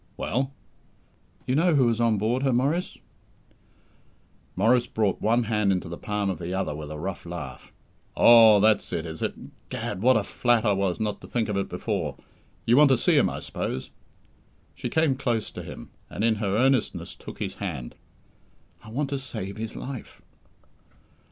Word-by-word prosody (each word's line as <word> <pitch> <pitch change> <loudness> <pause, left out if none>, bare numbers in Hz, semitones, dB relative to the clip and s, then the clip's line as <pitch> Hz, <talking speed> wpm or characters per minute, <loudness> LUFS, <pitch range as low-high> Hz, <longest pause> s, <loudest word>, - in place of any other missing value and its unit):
"Well?" 130 +2 -1 0.9
"You 125 - 0
know 165 +3 +3
who 135 -3 +4
was 115 0 +1
on 115 -2 +3
board 115 +5 0
her, 135 -1 +2
Maurice!" 140 +9 0 1.6
Maurice 120 +5 +3
brought 105 -3 0
one 115 +3 +2
hand 105 -3 +1
into 90 -2 -1
the 85 - -5
palm 105 -1 -2
of 95 - -6
the 90 +2 -4
other 95 -5 -1
with 75 0 -7
a 75 - -6
rough 90 +4 -5
laugh. 75 -7 -8 0.5
"Oh, 115 -3 +8
that's 110 +1 +3
it, 80 - -2
is 80 -1 -7
it! - - -1 0.3
'Gad, 95 - -4
what 130 +1 +5
a 105 - 0
flat 120 +2 +1
I 105 - +4
was 95 -2 -1
not 105 -2 -2
to - - -11
think 115 -3 -1
of 100 - -1
it 100 - -2
before! 90 - -3 0.5
You 120 +2 +4
want 150 -1 +7
to 130 - +4
see - - +2
him, - - +4
I - - -5
suppose?" 65 - -4 0.8
She - - -5
came 160 -3 +2
close 120 -5 -1
to - - -7
him, - - -10 0.2
and, 100 - -4
in 115 -1 +3
her 100 -1 0
earnestness, 130 -1 +1
took - - -11
his 100 -2 -3
hand. 75 -12 -4 0.9
"I 110 - -12
want 140 +5 -2
to 140 - -1
save 110 -7 -6
his 110 0 -5
life!" 130 -3 -7
110 Hz, 185 wpm, -26 LUFS, 95-125 Hz, 1.6 s, Oh